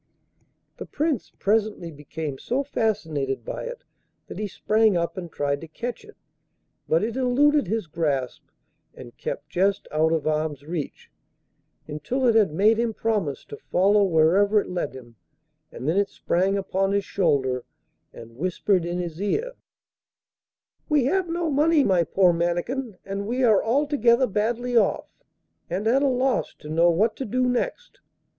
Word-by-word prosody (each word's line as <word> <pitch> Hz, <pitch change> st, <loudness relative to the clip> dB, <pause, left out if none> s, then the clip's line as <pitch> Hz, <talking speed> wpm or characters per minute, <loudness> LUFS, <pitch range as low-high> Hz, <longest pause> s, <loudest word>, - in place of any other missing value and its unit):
The -, -, -8 dB
Prince 300 Hz, -5 st, -2 dB
presently 205 Hz, -4 st, 0 dB
became 150 Hz, -1 st, -6 dB
so 265 Hz, +3 st, -1 dB
fascinated 160 Hz, -, -2 dB
by -, -, -5 dB
it -, -, -7 dB, 0.4 s
that -, -, -8 dB
he 210 Hz, -, -2 dB
sprang 215 Hz, 0 st, +2 dB
up 170 Hz, 0 st, -2 dB
and 175 Hz, -3 st, -7 dB
tried 140 Hz, 0 st, -1 dB
to 165 Hz, -, -8 dB
catch 240 Hz, -, -6 dB
it, 430 Hz, 0 st, -16 dB, 0.7 s
but 160 Hz, +4 st, +3 dB
it 225 Hz, +1 st, -2 dB
eluded 270 Hz, +1 st, +3 dB
his 220 Hz, +1 st, -1 dB
grasp 145 Hz, -6 st, -2 dB, 0.5 s
and 120 Hz, -2 st, -12 dB
kept 145 Hz, +1 st, -6 dB
just 195 Hz, +2 st, 0 dB
out 155 Hz, +1 st, +2 dB
of 160 Hz, -2 st, 0 dB
arm's 155 Hz, -2 st, -1 dB
reach, 160 Hz, -2 st, -6 dB, 0.8 s
until 155 Hz, -, -2 dB
it 235 Hz, -, +5 dB
had 215 Hz, -7 st, +4 dB
made 210 Hz, +7 st, +3 dB
him 230 Hz, -2 st, 0 dB
promise 205 Hz, -11 st, -2 dB
to 145 Hz, -, -9 dB
follow 200 Hz, +3 st, +2 dB
wherever 190 Hz, +4 st, +4 dB
it 200 Hz, -, -5 dB
led 175 Hz, -6 st, -3 dB
him, 120 Hz, -3 st, -13 dB, 0.5 s
and 125 Hz, -, -7 dB
then 165 Hz, +5 st, +1 dB
it 200 Hz, 0 st, +2 dB
sprang 190 Hz, +3 st, 0 dB
upon 195 Hz, 0 st, 0 dB
his 200 Hz, -1 st, 0 dB
shoulder 135 Hz, -9 st, 0 dB, 0.5 s
and 115 Hz, 0 st, -13 dB
whispered 185 Hz, +2 st, 0 dB
in 175 Hz, +1 st, -2 dB
his 175 Hz, -1 st, -5 dB
ear: 440 Hz, -, -1 dB, 1.4 s
'We 295 Hz, -5 st, +3 dB
have 370 Hz, +5 st, +1 dB
no 340 Hz, 0 st, -1 dB
money, 300 Hz, +1 st, +4 dB
my 180 Hz, -7 st, +3 dB
poor 180 Hz, +1 st, +3 dB
Mannikin, 180 Hz, +7 st, -2 dB
and 195 Hz, +1 st, -4 dB
we 250 Hz, +3 st, -1 dB
are 220 Hz, -5 st, +4 dB
altogether 260 Hz, -1 st, +3 dB
badly 240 Hz, +3 st, -1 dB
off, 230 Hz, -, +2 dB, 0.6 s
and 200 Hz, -, -2 dB
at 250 Hz, +5 st, +3 dB
a 285 Hz, -, +3 dB
loss 260 Hz, 0 st, 0 dB
to 150 Hz, -, -12 dB
know 165 Hz, +2 st, +4 dB
what 210 Hz, +7 st, +2 dB
to -, -, -3 dB
do 250 Hz, +4 st, 0 dB
next. -, -, -3 dB
200 Hz, 160 wpm, -24 LUFS, 160-245 Hz, 1.4 s, it